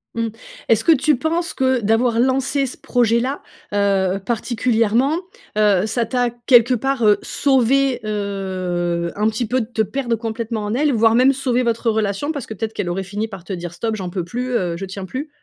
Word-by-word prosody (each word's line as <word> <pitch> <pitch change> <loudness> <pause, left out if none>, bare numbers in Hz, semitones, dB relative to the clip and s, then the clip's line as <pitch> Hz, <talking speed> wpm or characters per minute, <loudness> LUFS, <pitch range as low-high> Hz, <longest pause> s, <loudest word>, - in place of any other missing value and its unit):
Mmh. 230 0 0 0.4
Est-ce 225 -1 +3
que - - +5
tu 305 0 +3
penses 330 +6 -1
que, 260 -1 +1
d'avoir 230 +2 +2
lancé 270 +2 +1
ce 255 - -6
projet-là, 245 +3 +1 0.3
heu, 195 -2 +1
particulièrement, 235 +4 +1 0.4
heu, 205 -2 +3
ça 230 +2 -1
t'a, 245 +1 0
quelque 240 +1 +4
part, 270 +1 -1
heu, 210 -1 +5
sauvé, 270 0 +2
heu, 185 -4 -2
un 210 +1 +1
petit 220 +2 -2
peu, 255 +2 +1
de - - -3
te 230 -2 -1
perdre 240 +2 -1
complètement 225 -1 -4
en 210 - -2
elle, 295 +3 +2
voire 225 0 +4
même 255 +3 +5
sauvé 255 -2 0
votre 230 0 0
relation 215 +5 -1
parce 285 -5 -5
que - - -7
peut-être 220 +2 -4
qu'elle 200 -5 -3
aurait 185 +2 -2
fini 205 +4 -3
par 195 -4 -9
te 195 - -5
dire: 175 -2 -5
«Stop, 225 +3 -2
j'en 185 -4 -5
peux 175 -1 -3
plus, 250 +8 -4
heu, 180 -8 0
je 195 - -5
tiens 190 0 -7
plus». 265 - -5
230 Hz, 200 wpm, -20 LUFS, 200-255 Hz, 0.4 s, que